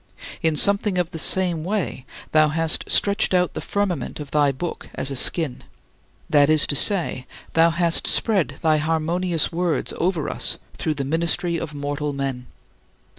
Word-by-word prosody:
In 160 -3 +1
something 200 +2 +3
of 180 -1 -1
the 165 - -7
same 175 -1 +3
way, 170 - -4 0.2
thou 155 0 +4
hast 160 +1 +1
stretched 200 -2 +2
out 180 -1 +1
the - - -5
firmament 200 -8 -3
of 145 -2 -8
thy 145 -2 +2
Book 165 +6 -7
as 140 - -2
a - - -4
skin 140 +1 0 0.6
that 145 -1 +3
is 155 -1 +4
to 145 - -2
say, 165 -8 +2 0.3
thou 165 +1 +4
hast 170 0 +2
spread 190 - +2
thy 155 -1 +3
harmonious 165 +2 -1
words 175 -1 -2
over 170 -4 -1
us - - 0 0.2
through 155 -2 -3
the 140 -1 -4
ministry 170 +3 -1
of 155 -2 -7
mortal 145 +1 -4
men. 135 -2 -4
160 Hz, 165 wpm, -21 LUFS, 145-175 Hz, 0.6 s, thou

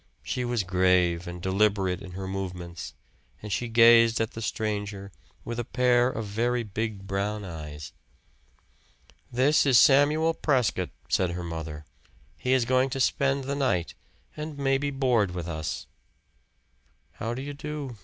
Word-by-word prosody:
She 125 - -2
was 120 -3 0
grave 90 -1 +2
and 90 0 -6
deliberate 95 -1 +1
in 90 -2 -9
her 95 +1 -5
movements, 90 -3 -6 0.4
and 105 +4 -5
she 120 +5 -1
gazed 115 0 +6
at 115 -1 -1
the 115 - -7
stranger 105 -3 -3 0.3
with 120 0 -4
a - - -1
pair 125 +1 +3
of 110 -3 -4
very 120 +4 0
big 105 -1 -4
brown 100 +1 -2
eyes. 75 -4 -8 1.4
"This 130 +5 +3
is 135 -4 +5
Samuel 150 +5 +5
Prescott," 125 - 0 0.2
said 95 - +1
her 90 0 -4
mother. 80 -3 -6 0.5
"He 125 - -2
is 130 -3 +3
going 130 +2 +2
to 135 0 -4
spend 135 +1 +1
the 140 +2 -3
night, 100 - 0 0.4
and 150 -1 -6
maybe 140 +1 +1
board 125 -9 +1
with 85 -1 -4
us." 80 -2 -4 1.3
"How 115 +2 -3
do 130 - -5
you 145 +1 -5
do?" 145 -4 -6
110 Hz, 150 wpm, -27 LUFS, 95-130 Hz, 1.4 s, gazed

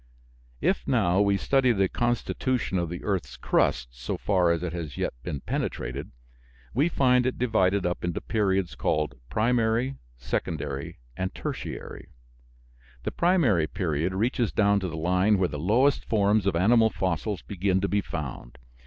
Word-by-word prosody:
If, - - 0
now, 90 +3 +3
we 100 -1 +3
study 135 +3 +3
the 95 -4 +2
constitution 120 -2 -1
of 85 -2 -2
the 85 - -6
earth's 85 -11 -2
crust 60 -2 +1
so 60 +1 -5
far 90 -4 +2
as 85 0 -1
it 90 -2 -3
has 80 -6 -5
yet - - -1
been 70 -3 -5
penetrated, - - -3 0.6
we 145 +8 +2
find 125 -5 +3
it 130 - -2
divided 100 -5 +2
up 90 0 -2
into 85 -1 -1
periods 95 -4 0
called 75 -2 0 0.2
Primary, 115 +3 +1 0.2
Secondary, 70 +3 -3 0.2
and 95 +4 -3
Tertiary. - - -6 1.0
The - - -2
primary 150 - +3
period 85 +1 -1
reaches 120 +3 0
down 100 -1 +3
to 95 - -3
the 80 - -6
line 90 +5 +2
where 95 -2 +1
the 75 - -5
lowest 120 - +3
forms 105 -1 +2
of 95 - +1
animal 110 +6 +4
fossils 95 +1 -2
begin 95 -1 0
to 100 - +1
be 100 +1 +1
found. 70 -9 -6
95 Hz, 155 wpm, -26 LUFS, 85-115 Hz, 1.0 s, animal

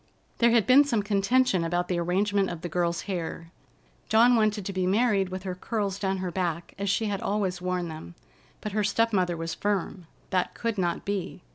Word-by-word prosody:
There 235 - +5
had 230 -3 +4
been 265 +3 +7
some 235 -7 0
contention 200 0 +2
about 175 +1 -1
the 180 -1 -1
arrangement 195 +3 +1
of 170 -2 -6
the 175 - -4
girl's 170 0 0
hair. 165 -3 -5 0.6
Dawn 235 +3 +6
wanted 215 -3 +1
to 195 - -4
be 185 -1 0
married 200 -2 +2
with 185 0 -6
her 185 -2 -3
curls 200 +1 -3
down 195 -1 -1
her 185 -1 -3
back, 170 -2 -3
as 200 0 -1
she 220 +3 +1
had 200 -2 -2
always 195 -3 -1
worn 180 -1 -2
them, 155 - -9 0.5
but 210 - -4
her 210 +1 0
step 230 +3 +1
mother 180 -3 +1
was 165 0 -4
firm. 195 -3 -2 0.2
That 185 -2 0
could 230 -3 -2
not 175 -2 -1
be. 195 -3 -4
195 Hz, 205 wpm, -27 LUFS, 175-210 Hz, 0.6 s, been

